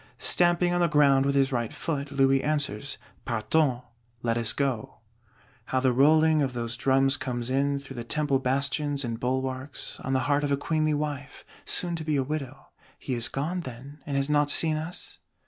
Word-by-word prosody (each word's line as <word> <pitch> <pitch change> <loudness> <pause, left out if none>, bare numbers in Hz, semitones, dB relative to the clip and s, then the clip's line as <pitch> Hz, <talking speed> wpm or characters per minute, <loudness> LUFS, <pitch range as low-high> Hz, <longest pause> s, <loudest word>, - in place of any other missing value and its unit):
"Stamping 175 0 +3
on 175 - +1
the 170 - +4
ground 140 -3 +4
with 140 - +1
his 135 0 +3
right 120 -3 -1
foot, 145 -3 -3
Louis 135 -1 +3
answers: 145 -4 -2 0.3
'Partons' 125 +3 0 0.4
(Let 115 -1 +1
us 115 -2 +1
go)." 135 -6 -2 0.7
How 130 - 0
the 130 -1 +2
rolling 155 +4 +4
of 135 -3 -1
those 120 -1 -3
drums 135 +2 +3
comes 120 -1 -3
in, 140 +1 +1
through 135 -2 -9
the 120 - -4
Temple 140 +2 +1
bastions 140 +2 0
and 115 -1 -4
bulwarks, 130 +2 -3
on 130 - -3
the 130 - +2
heart 145 +2 +1
of 145 - -1
a 140 - +2
queenly 155 +1 0
wife; 145 -2 -5 0.2
soon 175 -1 -2
to 160 - -5
be 155 -1 0
a 135 - +2
widow! 140 -1 -6 0.3
He 130 - -4
is 120 -1 +2
gone, 160 +7 -2
then, 135 0 -9
and 140 -1 -1
has 140 0 +1
not 145 -1 +2
seen 155 +1 +3
us? 160 +3 -6
140 Hz, 190 wpm, -27 LUFS, 130-150 Hz, 0.7 s, the